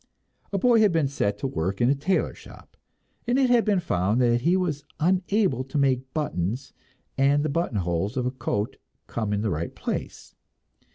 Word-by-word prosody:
A 200 - 0
boy 235 +3 +4
had 210 -3 +5
been 160 -4 +2
set 105 -7 -1
to 135 - -2
work 95 -3 -2
in 120 - +3
the 135 - +4
tailor 150 +7 0
shop, - - -15 0.5
and 245 +2 +2
it 260 -2 +3
had 240 -2 +5
been 205 -3 +2
found 105 - 0
that 120 -1 +3
he 175 +7 +3
was 155 -6 -2 0.2
unable 185 - +1
to 135 +2 -4
make 135 -3 +3
the 130 0 -21
buttons 130 - -2 0.5
and 140 +2 +3
the - - 0
buttonholes 105 - -1
of 125 - 0
a 125 - 0
coat 105 -5 -3 0.3
come 110 -3 -3
in 105 0 0
the 110 -2 0
right 85 +1 -3
place. - - -5
135 Hz, 190 wpm, -25 LUFS, 105-175 Hz, 0.5 s, had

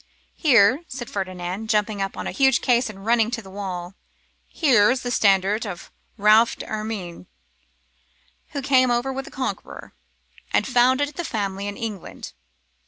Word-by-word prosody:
'Here,' 260 - +4
said 245 -2 -7
Ferdinand, 185 +2 -4
jumping 210 -2 0
upon 195 0 -4
a - - -3
huge 265 -2 +3
case 245 -1 +2
and 195 -1 -11
running 230 -1 +3
to 240 -1 -3
the 190 - -13
wall, 185 -2 -5 0.5
'here 245 -10 +3
is 255 0 0
the 245 - -3
standard 200 0 +2
of 190 -6 -7 0.3
Ralph 215 +2 +5
d'Ermyn, 215 - -6 1.3
who 280 - -3
came 260 -2 +4
over 245 +3 0
with 270 0 -5
the - - -10
Conqueror, 260 -1 -6 0.6
and - - +2
founded 260 +3 +3
the 345 - -4
family 200 - -3
in 205 - -5
England. 215 -5 -7
220 Hz, 150 wpm, -23 LUFS, 200-255 Hz, 1.3 s, Ralph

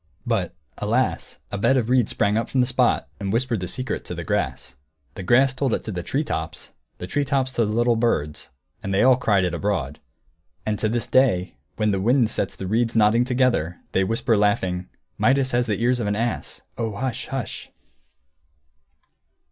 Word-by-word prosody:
But, 100 -8 -1 0.2
alas, - - -1
a 100 - -3
bed 135 +6 +3
of 120 -4 0
reeds 125 -3 +3
sprang 100 +1 +1
up 115 - -1
from 135 - 0
the 125 - +4
spot, 125 -1 +1
and 100 -2 -2
whispered 115 0 0
the 90 - -4
secret 130 +8 -3
to - - -6
the - - -5
grass. 65 - -2 0.4
The - - -7
grass 130 +8 +4
told 130 -3 0
it - - -5
to 110 - -5
the 90 -3 -3
tree 135 - -1
tops, 80 - -5 0.3
the - - -6
tree 145 +10 0
tops 135 -1 0
to 115 -4 +1
the - - -2
little 120 +1 +3
birds, 95 -11 -1 0.3
and 100 - -4
they 100 - +4 0.2
cried 100 -6 +3
it 90 -1 -1
all - - -2
abroad. 85 -8 -2 0.7
And 105 -2 -1
to 110 - 0
this 120 0 -1
day, 115 -9 +2 0.2
when 105 -1 +1
the 95 -1 0
wind 120 +1 +3
sets 95 - -2
the 95 - -6
reeds 115 +4 0
nodding 115 +2 +4
together, 125 -10 +1
they 95 - +2
whisper, 115 +3 +1
laughing, 95 -3 0 0.3
"Midas 135 0 +3
has 120 0 +1
the 105 -2 -1
ears 125 +2 +2
of 110 - -1
an 105 - 0
ass! 115 +2 -3 0.2
Oh, 110 -3 -2
hush, 130 +2 -3
hush!" 135 -3 -5
115 Hz, 195 wpm, -23 LUFS, 100-125 Hz, 0.7 s, the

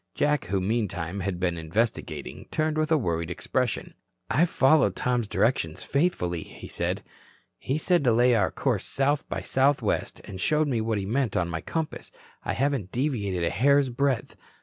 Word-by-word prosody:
Jack 150 0 +1
who 95 +2 0
meantime 95 -3 -2
had 95 -2 -2
been 90 -2 0
investigating, 80 - -2
turned 155 0 0
with 155 +1 0
a 160 - +6
worried 85 - -1
expression. 120 +7 -2 0.4
"I've 165 +6 +3
followed 135 - +4
Tom's 125 -3 0
directions 105 -8 0
faithfully," 115 - 0
he - - -10
said. - - -2 0.6
"He 135 +3 -1
said 175 0 +2
to 120 - +5
lay 120 +2 +4
our 105 -5 +3
course - - -1
south 140 +1 0
by - - -3
south 135 +2 +2
west - - -1
and 95 -2 -8
showed 150 - +2
me 120 -5 0
what 110 -1 0
he 100 - -2
meant 120 +1 0
on 85 -1 0
my 80 -1 -3
compass. 160 -2 -4 0.3
I - - -1
haven't 135 -8 -1
deviated 110 - -1
a 85 - +1
hair's 140 +5 +3
breadth. 130 0 -1
120 Hz, 175 wpm, -26 LUFS, 95-140 Hz, 0.6 s, a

